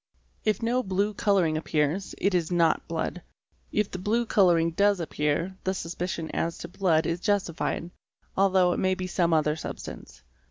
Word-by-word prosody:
If 215 +1 0
no 245 +2 +2
blue 200 -1 0
colouring 190 -7 +2
appears, 155 +4 -1
it 195 +1 +1
is 175 -1 0
not 170 -2 +2
blood; 165 +2 -3 0.5
if 210 -1 0
the 185 - -5
blue 225 +5 +1
colouring 175 -6 +3
does 200 +3 +3
appear 160 +3 -1
the 190 +1 -1
suspicion 170 -1 -4
as 165 0 -2
to - - -7
blood 165 -3 +1
is 165 +2 -1
justified, 180 -3 -1 0.4
although 190 -2 +4
it - - -2
may 185 0 +2
be 185 - -4
some 175 -2 +1
other 155 -1 +2
substance. 155 - -8
180 Hz, 165 wpm, -27 LUFS, 165-195 Hz, 0.5 s, although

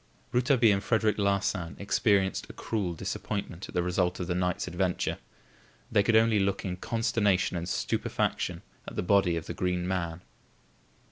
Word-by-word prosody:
Rouletabille 125 -3 +4
and 100 +1 -1
Frederic 110 -2 +1
Larsan 100 -4 0
experienced 100 -1 +1
a - - -8
cruel 100 -6 -2
disappointment 100 +1 -4
at - - -10
the 90 - +2
result 90 0 0
of 90 - -2
the 90 - -1
night's 90 0 -1
adventure. 90 0 -1 0.7
They 105 - +5
could 110 +3 +2
only 110 -1 +5
look 100 0 0
in 90 -1 -3
consternation 105 -4 +1
and 85 +1 -3
stupefaction - - -1 0.2
at - - -7
the - - -1
body 90 -2 +3
of 85 - -4
the - - -5
Green 90 0 -1
Man. 85 -2 -2
95 Hz, 160 wpm, -29 LUFS, 90-105 Hz, 0.7 s, They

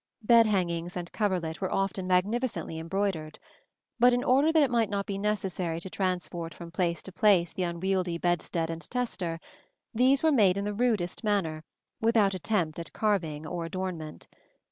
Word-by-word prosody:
Bed 230 0 +6
hangings 175 -3 -1
and 175 -1 -5
coverlet 180 -6 -1
were 190 - -1
often 195 -1 -1
magnificently 185 -3 0
embroidered; 165 -2 -2 0.6
but 245 +1 +6
in 245 - +1
order 275 +5 +4
that 320 -2 +5
it 265 - +1
might 230 -3 +2
not 200 -1 -2
be 195 -1 -4
necessary 190 -5 -1
to 185 +2 -9
transport 175 -3 -3
from 170 -1 -9
place 170 -1 -1
to 190 - -8
place 185 -3 +3
the - - -4
unwieldy 180 0 -1
bedstead 170 -1 -1
and 165 0 -6
tester, 190 -9 -2 0.5
these 260 +5 +3
were 320 - +5
made 200 -9 +4
in 200 - -2
the 210 - -2
rudest 215 -6 0
manner, 175 -7 0 0.4
without 225 -3 +3
attempt 180 -4 -1
at 170 - -7
carving 165 -8 -1
or 170 +1 -4
adornment. 165 -3 -5
185 Hz, 165 wpm, -28 LUFS, 170-210 Hz, 0.6 s, Bed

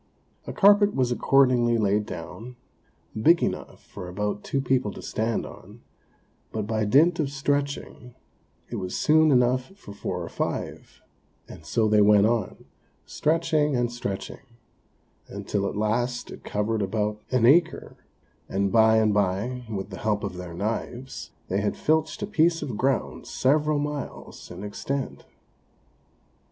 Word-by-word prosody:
A - - -3
carpet 205 +1 +5
was 125 -2 +1
accordingly 125 -2 +3
laid 105 0 +1
down, 120 +1 -8 0.7
big 170 +7 +5
enough - - -4
for 90 - -9
about 105 +2 -3
two 135 - -1
people 130 -5 0
to - - -9
stand 110 +1 -2
on; - - -13 0.7
but 110 -2 -3
by 110 0 -1
dint 160 +10 +4
of 145 -3 0
stretching, 140 -3 -3 0.6
it 120 - -3
was 95 -2 -4
soon 155 +1 +4
enough 125 -1 +3
for 100 - -11
four 100 - -4
or - - -6
five; - - -5 0.4
and 75 - -12
so 110 +7 +1
they 105 0 +4
went 105 0 +6
on, 115 -3 -1 0.4
stretching 155 -2 +1
and 120 -1 0
stretching, 100 -5 -5 0.9
until 100 -1 -3
at - - -6
last 120 +4 -1
it - - -11
covered 105 +1 -1
about 105 +1 -2
an 125 -3 +2
acre, 160 +6 +3 0.5
and 100 0 0
by 110 -1 +5
and 110 -1 +3
by, 105 +6 -1
with 100 -1 -5
the 95 - -7
help 105 -1 -1
of 100 -3 -4
their 90 -2 -7
knives, 115 +6 -4 0.2
they 95 +2 0
had 105 - -1
filched 155 +3 0
a - - +1
piece 165 -5 +2
of 130 -7 -4
ground 130 +3 -1
several 150 +3 +1
miles 145 -1 -5
in 90 +3 -8
extent. 135 +6 -4
120 Hz, 145 wpm, -25 LUFS, 105-140 Hz, 0.9 s, went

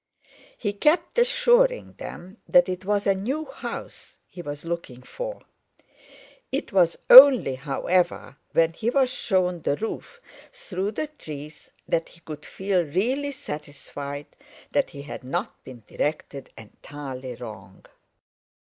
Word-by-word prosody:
He 205 -3 -2
kept 305 - +2
assuring - - +3
them 185 +5 -9
that 265 0 +5
it 185 0 -4
was 205 0 0
a 195 - +4
new 260 +11 -3
house - - -8
he 175 - -10
was 145 -1 -7
looking 165 -7 -5
for; - - -7 1.1
it - - -3
was 175 -3 +3
only, 260 - +10
however, 150 +2 -1 0.2
when 165 0 +3
he 225 +7 -1
was 260 0 +2
shown 180 -7 0
the 145 - 0
roof 225 - -6 0.3
through 355 - -4
the 310 - -2
trees 155 - -10 0.2
that 165 - 0
he 170 - -20
could 155 -2 -9
feel 190 -2 0
really 245 - -1
satisfied 145 - -7 0.5
that 285 - +1
he 140 -3 -9
had 145 - -8
not 175 - -4
been 125 -4 -12
directed 145 -2 -3
entirely 130 +3 -8
wrong. 105 -6 -11
180 Hz, 130 wpm, -25 LUFS, -, 1.1 s, only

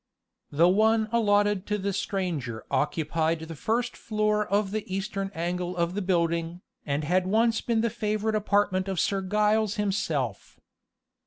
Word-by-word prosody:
The 165 +4 +4
one 220 +3 +3
allotted 205 -3 +2
to 210 - 0
the 200 0 -2
stranger 170 - -3
occupied 160 +1 0
the 160 0 -7
first 230 - -1
floor 215 -1 0
of 200 -1 +1
the 215 0 -2
eastern 195 0 -2
angle 175 +2 -2
of 170 0 0
the 205 - -2
building, 170 -2 0 0.3
and 145 +1 -1
had 180 +4 +1
once 225 +3 +2
been 230 -2 0
the 230 -1 0
favorite 215 +1 -1
apartment 205 -3 +1
of 190 -3 -2
Sir 195 -1 +1
Giles 210 +2 +1
himself. 205 -1 -2
195 Hz, 150 wpm, -27 LUFS, 175-215 Hz, 0.3 s, The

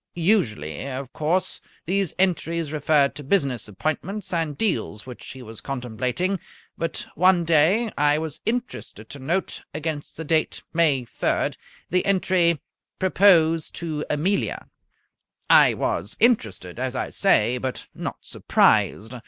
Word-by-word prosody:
Usually, 140 - 0
of 130 -1 -6
course, 165 +5 -1 0.2
these 190 0 0
entries 170 -4 0
referred 150 -2 +2
to 145 - -8
business 135 - +1
appointments 180 - -3
and 160 -4 -1
deals 185 - -2
which 125 -2 -10
he 130 -1 -8
was 110 -1 -10
contemplating, 130 - -2 0.4
but 165 -1 -3
one 180 +1 +4
day 170 +8 +3
I 145 0 +3
was 155 -1 -4
interested 225 - -4
to 145 - -8
note, 170 +8 -2
against 155 -1 -4
the 160 - -4
date 160 0 0
May 150 -7 +3
3rd, - - -1 0.4
the 180 +1 +2
entry: 180 -4 +2 0.4
"Propose 170 -4 +4
to 155 -3 -3
Amelia" 180 +7 -1 0.8
I - - +7
was - - -2
interested, 110 - +1
as 130 0 -2
I - - -3
say, 125 - +2
but 130 0 -4
not - - -6
surprised. 110 +4 +2
155 Hz, 130 wpm, -24 LUFS, 130-185 Hz, 0.8 s, I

